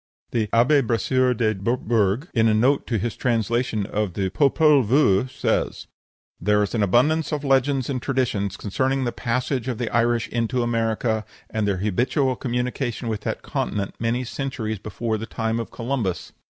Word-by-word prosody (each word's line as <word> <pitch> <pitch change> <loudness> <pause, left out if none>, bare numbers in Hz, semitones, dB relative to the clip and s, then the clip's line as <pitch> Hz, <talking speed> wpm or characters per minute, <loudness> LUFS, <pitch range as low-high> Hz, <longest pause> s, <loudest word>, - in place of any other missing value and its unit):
The 110 -3 0
Abbé 125 +7 +4
Brasseur 125 +3 +2
de 110 -1 +2
Bourbourg, 110 - 0
in 115 -2 +3
a 110 - +3
note 130 +6 +2
to 115 - 0
his 115 +3 -2
translation 115 -2 0
of 105 -3 -2
the 95 -2 -1
"Popol 140 +5 +4
Vuh," 120 -1 +3
says: - - -1 0.5
"There 105 0 +2
is 100 - -3
an 115 - 0
abundance 145 - +2
of 150 -2 -2
legends 135 -1 +2
and 130 -3 -2
traditions 120 -8 -1
concerning 130 +6 -1
the 120 - -1
passage 125 +1 -2
of 125 -3 -2
the 120 -1 -3
Irish 120 0 +2
into 120 +1 0
America, 115 -1 0 0.3
and 110 -2 -1
their 100 -2 +1
habitual 125 +7 +1
communication 125 -1 -2
with 110 -2 -3
that - - -4
continent 100 -2 -2
many 120 +2 0
centuries 120 -4 -4
before 110 +1 -3
the 110 - -6
time 115 0 -2
of 115 - -4
Columbus. 115 -7 -3
120 Hz, 165 wpm, -23 LUFS, 110-130 Hz, 0.5 s, Abbé